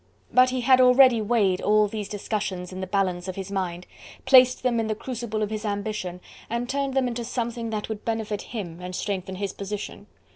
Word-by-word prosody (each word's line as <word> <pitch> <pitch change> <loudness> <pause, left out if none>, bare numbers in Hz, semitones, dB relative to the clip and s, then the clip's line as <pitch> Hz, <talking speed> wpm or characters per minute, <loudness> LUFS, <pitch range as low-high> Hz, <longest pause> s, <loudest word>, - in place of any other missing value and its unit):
But 255 0 +6
he 255 0 -2
had 255 +1 +5
already 250 -2 +6
weighed 205 -4 +2
all 210 0 +4
these 210 -1 -5
discussions 200 -3 -3
in 185 - -6
the 190 - -4
balance 185 -2 -1
of 185 - -4
his 195 0 -6
mind, 180 -2 -3 0.4
placed 255 -1 +6
them 245 -2 +1
in 225 - -1
the 215 - -1
crucible 225 -2 -4
of 210 - -3
his 215 0 -3
ambition, 200 -4 -3 0.3
and 235 +1 -2
turned 275 0 -2
them 265 -2 +2
into 240 0 -3
something 235 -1 -3
that 215 -1 -3
would 220 -1 -6
benefit 220 -2 -2
him 180 -8 -6
and 180 0 -6
strengthen 190 -1 -3
his 195 0 -3
position. 200 +1 -6
215 Hz, 205 wpm, -25 LUFS, 195-240 Hz, 0.4 s, But